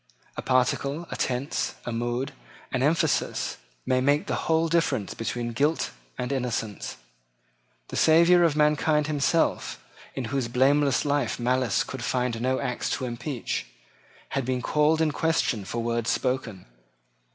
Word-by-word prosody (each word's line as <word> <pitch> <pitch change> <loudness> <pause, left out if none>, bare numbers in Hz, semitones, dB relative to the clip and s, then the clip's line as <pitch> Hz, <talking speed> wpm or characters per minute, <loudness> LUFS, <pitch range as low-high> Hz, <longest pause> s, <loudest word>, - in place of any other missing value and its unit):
A - - -4
particle, 140 +5 +1
a - - -3
tense, 130 +3 -1
a 120 - -3
mood, 120 +4 -2 0.4
an 130 - 0
emphasis, 155 +4 +1 0.3
may 130 0 +2
make 145 +3 +2
the - - -2 0.2
whole 160 0 +3
difference 155 - 0
between 120 +1 -3
guilt 145 - +1 0.3
and 125 +1 -3
innocence. 120 -6 -3 0.9
The - - -6
Saviour 170 +2 +6
of 165 -4 +3
mankind 150 0 +3
himself, 155 +2 +1 0.4
in 130 - -3
whose 135 -3 0
blameless 135 +3 +3
life 145 -5 0
malice 125 0 +1
could 130 -2 -7
find 125 -2 -1
no 130 +1 +1
acts 125 - -2
to 130 - -4
impeach, 120 - -3 0.6
had 135 - -1
been 125 0 -2
called 155 +1 +3
in 155 -1 +2
question 145 - 0
for 115 +3 -3
words 115 0 -1
spoken. 125 -7 -1
130 Hz, 140 wpm, -26 LUFS, 120-150 Hz, 0.9 s, Saviour